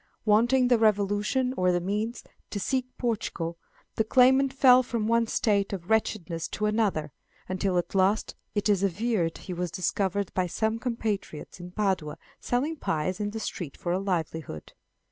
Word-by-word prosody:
Wanting 240 +4 +4
the 245 -2 +4
resolution, 210 +4 +2
or 180 -4 +2
the 175 - +1
means, 210 +6 -2 0.3
to 205 - -4
seek 255 +5 -1
Portugal, 180 -8 -2 0.4
the 220 - +3
claimant 265 +3 +4
fell 255 -2 +6
from 235 -3 -2
one 230 +1 +2
state 200 -3 +1
of 185 +1 -6
wretchedness 175 -7 0
to 210 - -3
another, 210 -9 0 0.4
until, 185 0 0
at 175 - -2
last, 195 +3 +2 0.2
it 205 - +1
is 200 -3 +3
averred 200 -2 0
he 185 - -7
was 180 0 -2
discovered 190 +2 -1
by 185 -1 0
some 220 +5 -1
compatriots 220 -10 -4
in 175 0 -8
Padua 185 -6 -1 0.2
selling 285 +7 -1
pies 175 - -2
in 205 -1 -1
the 220 +2 -5
street 170 -8 -5
for 175 - -3
a 180 - +1
livelihood. 160 - -3
205 Hz, 165 wpm, -27 LUFS, 180-230 Hz, 0.4 s, fell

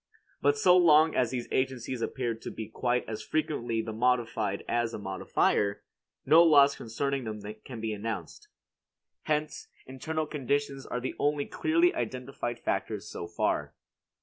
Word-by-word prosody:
But 435 - +3
so 180 - +5
long 160 -3 +6
as 125 -3 +2
these 125 -1 -4
agencies 130 -2 -1
appear 120 -1 -2
to 110 - -8
be 110 - -6
quite 125 +2 -1
as 110 -1 -5
frequently 120 -7 -1
the 110 - -5
modified 115 -4 0
as 120 -1 0
the - - -3
modifier, 100 +1 0 0.4
no 155 +5 +7
laws 145 -4 +6
concerning 135 +4 -2
them 110 -1 -5 0.2
can 125 -4 -8
be 110 -1 -2
announced. 105 -5 -5 0.8
Hence, 150 0 -2 0.2
internal 155 +5 -3
conditions 140 -1 -2
are 125 - -2
the 130 - -3
only 145 0 +1
clearly 335 +3 +2
identified 125 -2 -4
factors 105 -1 -3
so 85 - -6
far. - - -1
125 Hz, 150 wpm, -29 LUFS, 115-145 Hz, 0.8 s, no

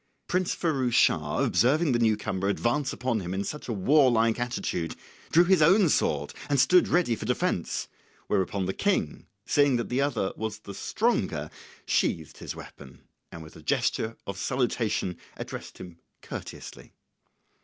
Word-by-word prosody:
Prince 180 0 0
Firouz 135 -8 0
Schah 75 -8 +3
observing 150 +5 +3
the 120 - +2
new 110 -2 +3
comer 100 -2 -2
advance 125 +7 0
upon 120 -2 -1
him 90 -1 -4
in 100 +1 -2 0.2
a - - -2
warlike 115 0 +3
attitude, 120 -9 -2 0.3
drew 170 - +6
his 185 -1 +3
own 180 +3 +5
sword 75 - 0 0.2
and 140 -1 +2
stood 180 +7 +5
ready 170 -10 +2
for 110 - -7
defence; 125 - -1 0.4
whereupon 95 0 0
the 95 - -2
King, 195 - -1 0.2
seeing 145 -3 +3
that 120 - -2
the 125 +2 +1
other 125 -9 0
was 110 -1 -4
the 100 - -10
stronger, - - -1 0.3
sheathed - - 0
his - - -6
weapon, 65 -3 -12 0.3
and 80 - -9
with 80 - -14
a - - -12
gesture 110 +1 -1
of 100 -1 -6
salutation 110 -8 -1 0.2
addressed - - -7
him 90 -2 -11 0.2
courteously. - - -9
120 Hz, 155 wpm, -27 LUFS, 95-145 Hz, 0.4 s, drew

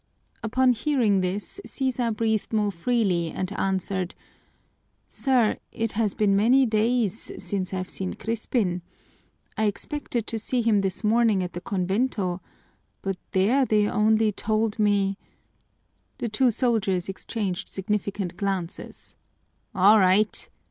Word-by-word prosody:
Upon 250 +3 +3
hearing 230 -6 +2
this 195 - -3
Sisa 255 -3 -1
breathed 220 -1 -1
more 210 -2 +1
freely 185 -3 0
and 185 +3 -4
answered, 190 -2 -2 0.9
"Sir, 255 -5 +1
it 225 -1 -2
has 215 -2 0
been 200 -2 +2
many 245 +6 +5
days 225 -1 +1
since 190 -3 -2
I've 185 -1 -3
seen 190 0 -4
Crispin. 220 -5 -1 0.8
I 220 - +2
expected 235 +2 -2
to 225 - -4
see 240 +2 0
him 215 -3 +3
this 195 +2 -2
morning 220 -3 +3
at 180 - -5
the 175 - -6
convento, 190 -1 -1 0.6
but 195 -1 -2
there 220 +9 +3
they 210 -4 +2
only 215 +1 +3
told 215 +1 -1
me 200 -2 +2 0.5
" - - -45
The 235 - -3
two 245 +4 +3
soldiers 210 -7 0
exchanged 195 -1 -4
significant 195 -2 -3
glances. 195 -4 -4 0.6
"All 200 +3 +6
right!" 195 +3 +2
210 Hz, 130 wpm, -25 LUFS, 190-230 Hz, 0.9 s, All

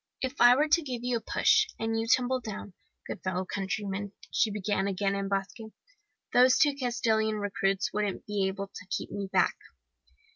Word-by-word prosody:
"'If 260 0 -3
I 245 +1 +8
were 300 +4 +2
to 335 +2 +4
give 250 -5 -5
you 245 -1 0
a - - -7
push 430 - +3
and 225 0 -1
you 225 - -2
tumbled 255 +1 +2
down, 205 -3 -7 0.3
good - - -6
fellow 185 0 -2
countryman,' 200 +1 -3 0.2
she 220 - +2
began 205 -1 -1
again 195 0 0
in 195 0 -2
Basque, 195 -1 -2 0.8
'those 255 +1 +6
two 290 -2 +4
Castilian 225 -4 0
recruits 195 -2 -1
wouldn't 205 -2 -2
be 205 -2 0
able 195 +1 -3
to 185 - -10
keep - - -3
me 200 -1 -4
back. - - +3
210 Hz, 180 wpm, -29 LUFS, 195-245 Hz, 0.8 s, I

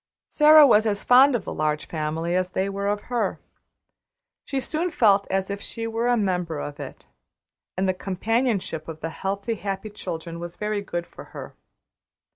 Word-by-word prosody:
Sara 305 0 +8
was 220 -4 +5
as 205 -1 -1
fond 260 +2 +6
of 215 - -3
the - - -4
Large 150 0 -1
Family 160 +2 -2
as 185 0 -1
they 190 - 0
were 200 0 -3
of 205 0 0
her. 240 +1 -2 1.1
She 275 - -2
soon 320 +6 -2
felt 205 - +3
as 195 +1 -1
if 200 0 -5
she 230 - -5
were 225 +1 -1
a 245 0 +3
member 180 -6 -1
of 145 0 -6
it, - - -9 0.7
and 190 +1 +1
the 185 - +2
companionship 195 -3 -1
of 160 -1 -8
the 165 - -4
healthy, 200 +6 -3
happy 200 0 -5
children 170 -4 -6
was 175 0 -7
very 210 -1 -2
good 175 -3 -4
for - - -12
her. - - -8
200 Hz, 180 wpm, -24 LUFS, 175-225 Hz, 1.1 s, Sara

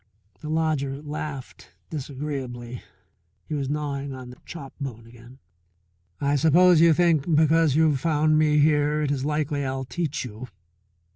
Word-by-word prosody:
The 150 - -7
lodger 155 -4 0
laughed 145 -3 -7 0.2
disagreeably, 130 -5 -5 0.6
he - - -6
was 140 -3 -2
gnawing 140 -2 -3
on 130 -1 -9
the 125 - -13
chop 140 -6 -9
bone 115 -5 -6
again. 120 +2 -15 0.8
"I 145 0 +1
suppose 165 +3 +5
you 165 0 +7
think 165 -1 +2
because 160 -1 +4
you've 155 -3 +3
found 155 +1 +2
me 150 -1 +3
here 150 0 +3
it 145 - 0
is 135 -1 -1
likely 150 -1 -1
I'll 130 0 -3
teach 155 -1 -3
you 125 - -7
you! 115 +5 -9
145 Hz, 150 wpm, -25 LUFS, 135-155 Hz, 0.8 s, you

